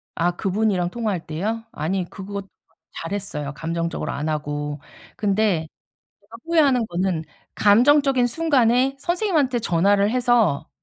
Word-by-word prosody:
아 175 +1 +1
그분이랑 195 -2 0
통화할 210 -5 -3
때요? 210 +9 -3
아니 175 +4 -2
그거 200 +1 -6 0.6
잘했어요. 165 -6 -4
감정적으로 165 +2 -3
안 145 +2 -3
하고. 145 -1 -3 0.4
근데 200 -5 +1 0.5
제가 210 +3 -15
후회하는 290 -8 +3
거는 175 -2 -1 0.3
감정적인 255 +4 +4
순간에 260 -2 +2
선생님한테 325 - 0
전화를 200 +1 +2
해서 240 - +2
205 Hz, 295 characters per minute, -22 LUFS, 170-245 Hz, 0.6 s, 감정적인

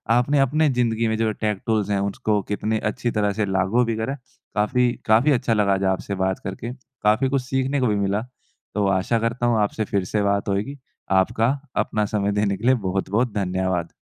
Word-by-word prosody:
आपने 140 +4 +2
अपने 150 +3 +3
ज़िन्दगी 115 -3 +1
में 110 - 0
जो 110 -1 +1
टेक 105 -2 0
टूल्स 110 -3 0
हैं 100 -1 +1
उसको 105 -2 0
कितने 110 +1 0
अच्छी 120 +2 -2
तरह 105 -2 0
से 105 0 0
लागू 95 +5 +1
भी 115 -1 -1
करा 110 +5 -2
है। 140 - -7 0.4
काफ़ी, 120 +4 +2
काफ़ी 115 +7 +4
अच्छा 125 -3 +2
लगा 100 -2 +2
आपसे 100 +1 -3
बात 95 0 -1
करके, 120 +2 -5 0.3
काफ़ी 110 +6 +3
कुछ 135 -1 +1
सीखने 135 +2 -1
को 125 - +2
भी 105 - +1
मिला 100 +1 0 0.5
तो 105 -1 +1
आशा 95 +5 +1
करता 115 +2 -1
हूँ 115 -2 +2
आपसे 105 +1 0
फिर 100 -2 +1
से 105 +3 -1
बात 100 0 0
होएगी 105 +9 -2 0.4
आपका 115 +4 +1 0.3
अपना 105 -1 +1
समय 100 -1 0
देने 100 -1 0
के 110 - -7
लिए 130 +1 +5
बहुत-बहुत 100 +5 0
धन्यवाद। 95 -3 -1
110 Hz, 200 wpm, -23 LUFS, 100-120 Hz, 0.5 s, लिए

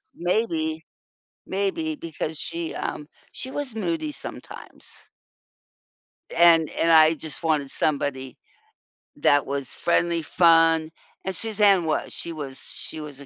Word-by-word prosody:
maybe 165 -4 -1 0.6
maybe 200 - -2
because 160 - -5
she, 165 0 -4
um 150 - -4 0.3
she 260 - -6
was 280 -5 -2
moody 315 +6 -2
sometimes. - - -7 1.3
And 165 -2 +5
and 165 - 0
I 160 0 +7
just 160 0 -7
wanted 150 -4 0
somebody 140 -3 -1 0.8
that 145 0 +3
was 140 0 -3
friendly, 170 -1 +1
fun, 165 -1 +4 0.3
and 190 -1 -2
Suzanne 205 -5 +3
was. 155 - -1
She 170 - -4
was 140 -4 -5
she 160 - -2
was 145 -2 -7
a 140 - -11
165 Hz, 120 wpm, -24 LUFS, 155-190 Hz, 1.3 s, I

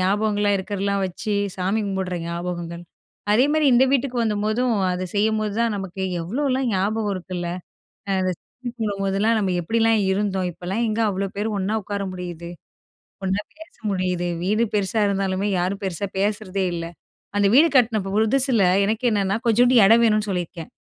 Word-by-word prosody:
ஞாபகங்கள்லாம் 205 +1 +1
இருக்கிறதலாம் 200 0 -2
வச்சு, 205 +4 -4 0.2
சாமி 190 +4 0
கும்பிடுற 190 -2 -2
ஞாபகங்கள். 170 0 -5 0.5
அதேமாரி 290 +7 +3
இந்த 245 +2 +6
வீட்டுக்கு 270 -2 0
வந்த 220 -2 0
போதும் 235 +2 +1 0.2
அத 185 +1 -3
செய்யும்போது 215 0 +1
தான் 230 -2 +1
நமக்கு 195 -1 -5 0.2
எவ்ளோலாம் 260 - -1
ஞாபகம் 205 +2 0
இருக்குல்ல. 180 -1 -5 0.6
அ - - -1
அந்த 185 0 0
சாமி 250 -1 -9
போடும் 205 -2 -2
போதெல்லாம் 200 +4 +2
நம்ம 195 -3 0
எப்டிலாம் 225 +3 +2
இருந்தோம். 190 -2 -1
இப்பல்லாம் 185 +7 -3
எங்க 215 +1 -1
அவ்ளோ 195 0 -2
பேரு 210 +2 -1
ஒன்னா 195 +3 -1
உட்கார 200 +1 -4
முடியுது? 175 -2 -7 0.8
ஒன்னா 190 +2 0 0.2
பேச 320 +1 -13 0.2
முடியுது, 180 -2 -1 0.2
வீடு 215 +5 +2
பெருசா 210 +2 +1
இருந்தாலுமே, 195 0 -1
யாரும் 185 +3 -1
பெருசா 190 +1 -2
பேசுறதே 200 -1 -1
இல்ல. 170 -1 -4 0.5
அந்த 205 0 +3
வீடு 310 +5 +7
கட்ன 240 -4 +4
ப் 195 - -4
புதுசில 230 +2 +3 0.2
எனக்கு 220 +5 -1
என்னன்னா, 200 -1 +1
கொஞ்சோன்டு 245 +2 +4
இடம் 225 +4 +6
வேணுன்னு 215 -1 +2
சொல்லியிருக்கேன் 175 -2 -4
200 Hz, 155 wpm, -22 LUFS, 185-225 Hz, 0.8 s, வீடு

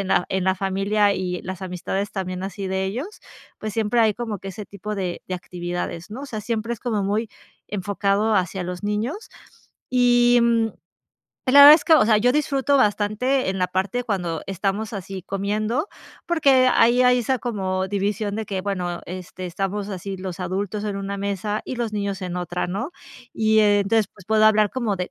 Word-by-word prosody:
en 195 - -3
la 180 - +2
en 190 -1 -1
la 190 0 +3
familia 195 +2 +1
y 180 -2 -3
las 185 +1 -6
amistades 190 +2 -3
también 185 -2 -4
así 195 +1 -5
de 190 0 -1
ellos, 260 - -5 0.4
pues, 215 0 -5
siempre 225 +2 +1
hay 220 -2 +4
como 225 -3 -4
que 195 - -8
ese 195 +2 -7
tipo 210 +1 -6
de 185 -3 -4
de 185 - -2
actividades, 175 -1 -5
¿no?, 230 +5 -6
o - - -6
sea, 220 -5 -5
siempre 230 +1 -2
es 230 - -16
como 220 -5 -1
muy 210 +3 -1 0.4
enfocado 200 +2 0
hacia 185 0 -1
los 180 +2 -6
niños 225 - -3 0.6
y, 245 -1 +4
mm, 230 -1 +3 0.8
la 285 +2 +8
verdad 290 - +12
es 315 - +1
que, 325 - +6
o 310 - +6
sea, 215 -2 +5
yo 245 +4 +3
disfruto 280 -1 +1
bastante 215 +3 +1
en 190 - -3
la 180 0 +1
parte 195 +7 -1
cuando 180 -8 -2
estamos 195 +3 -2
así 195 -1 -6
comiendo, 215 - -2 0.4
porque, 275 -7 +4
ahí 240 +2 +4
hay 250 0 +5
esa 255 +2 0
como 190 -5 -2
división 205 +1 -1
de 220 - -3
que 190 -1 -3
bueno, 180 -3 -3
este 185 0 -7
estamos 195 +3 -3
así 195 0 -5
los 185 -1 -6
adultos 195 +3 -3
en 205 -2 -2
una 200 0 -4
mesa 200 +1 -2
y 255 - -5
los 235 -2 -2
niños 200 -2 -2
en 180 -1 -4
otra, 180 0 -2
¿no? 205 - -4 0.4
Y 220 0 +3
entonces, 205 0 +3
pues, 205 -4 -18
puedo 215 0 +3
hablar 215 -1 +4
como 235 -6 -1
de 180 0 -4
205 Hz, 195 wpm, -23 LUFS, 190-225 Hz, 0.8 s, verdad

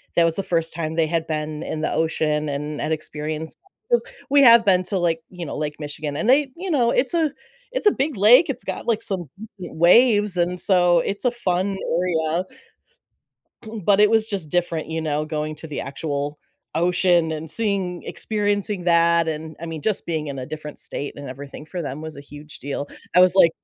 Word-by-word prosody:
that 170 - +5
was 165 -1 +1
the 195 - -2
first 165 -2 0
time 160 -1 -3
they 160 -1 +2
had 165 0 -1
been 155 0 -3
in 155 - -4
the - - -1
ocean 155 -2 0
and 150 +1 -4
and 155 - -2
experienced 155 0 -4 0.3
that, 480 - +4
'cause - - -13 0.3
we 285 0 +5
have 235 -3 +8
been 185 -2 +4
to, 190 +1 -2
like, 165 -2 0
you 180 -2 -7
know, - - -5
Lake 150 -1 -3
Michigan 145 0 -5
and 215 +9 0
they 270 0 +4
you 375 +1 -5
know, 245 -7 +2
it's 265 +5 +1
a 320 -4 +2 0.4
it's - - +1
a - - +7
big 270 -3 -2
lake, 250 - +6
it's 255 -2 -3
got - - -5
like 230 -3 +1
some 180 -7 -3 0.3
waves 205 +4 +4
and 180 +1 0
so 175 -3 +4
it's 200 +7 -3
a 250 - +4
fun 195 -4 -1 0.5
area. 170 +3 0 1.4
But 200 -1 +4
it 210 0 +6
was 220 -1 +3
just 190 -8 -4
different, 170 -2 -1
you 160 0 -2
know, 150 -1 -1
going 155 0 -3
to 160 - -9
the 145 - -4
actual 145 +1 -4 0.4
ocean 175 -1 +2
and 155 0 -5
seeing 195 -3 -1
experiencing 205 -3 -2
that, 170 -1 +4
and 160 0 -5
I 170 - -5
mean, 160 -2 -6
just 215 -3 -1
being 160 -3 -2
in 140 -1 -5
a 130 - -5
different 150 -1 -8
state 145 - -5
and 145 -1 -8
everything 140 +3 -9
for 175 +1 -5
them 140 +1 -5
was 160 -1 -7
a 140 - -8
huge 145 +1 -12
deal. 145 +1 -4 0.3
I 180 - +8
was 185 0 +7
like 170 -3 +6
170 Hz, 210 wpm, -22 LUFS, 155-200 Hz, 1.4 s, have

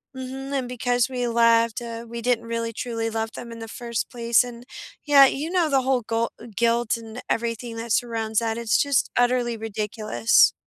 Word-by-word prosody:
Mhm, 265 +1 -6
and 255 -2 -2
because 245 0 0
we 250 -2 -2
left, 230 -1 +3
uh, 230 -1 -6
we 235 0 -7
didn't 240 -1 +1
really 230 0 -3
truly 230 -1 -3
love 225 0 -3
them 235 - -8
in 230 - -8
the 225 - -7
first 235 0 -4
place. 235 0 +3
And, 240 -1 -9 0.4
yeah, 285 -2 +8
you 280 +4 -2
know, 355 -4 +2
the 270 -2 +2
whole 260 -1 +2
gol 230 +1 -1 0.2
guilt, 235 0 +1
and 225 +1 -9
everything, 230 0 -2
that 230 0 -5
surrounds 225 -2 0
that, 225 -1 -2
it's 230 -1 +1
just 280 -3 +1
utterly 245 -1 +2
ridiculous. 215 +1 +2
235 Hz, 185 wpm, -24 LUFS, 230-245 Hz, 0.4 s, yeah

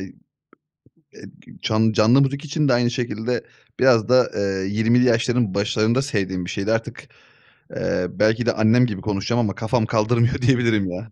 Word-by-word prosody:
eee, 95 -1 -9 1.5
can 110 0 +1
canlı 115 +6 +4
müzik 140 +3 -2
için 150 -1 -1
de - - +3
aynı 120 0 +2
şekilde. 120 0 -3 0.4
Biraz 120 -4 +3
da, 125 0 +3
eee, 95 -1 -2
20'li 115 +4 +2
yaşların 120 -3 +1
başlarında 110 +5 0
sevdiğim 95 -9 -3
bir 90 - -6
şeydi 100 +3 -2
artık, 115 0 -4 0.7
eee, 90 - -2
belki 110 +3 0
de 120 - +1
annem 115 +3 +3
gibi 105 -5 -5
konuşacağım 105 +4 -2
ama 105 -5 -1
kafam 115 0 -1
kaldırmıyor, 120 +4 0
diyebilirim 115 -7 +1
ya. 110 +5 -8
115 Hz, 155 wpm, -21 LUFS, 105-125 Hz, 1.5 s, canlı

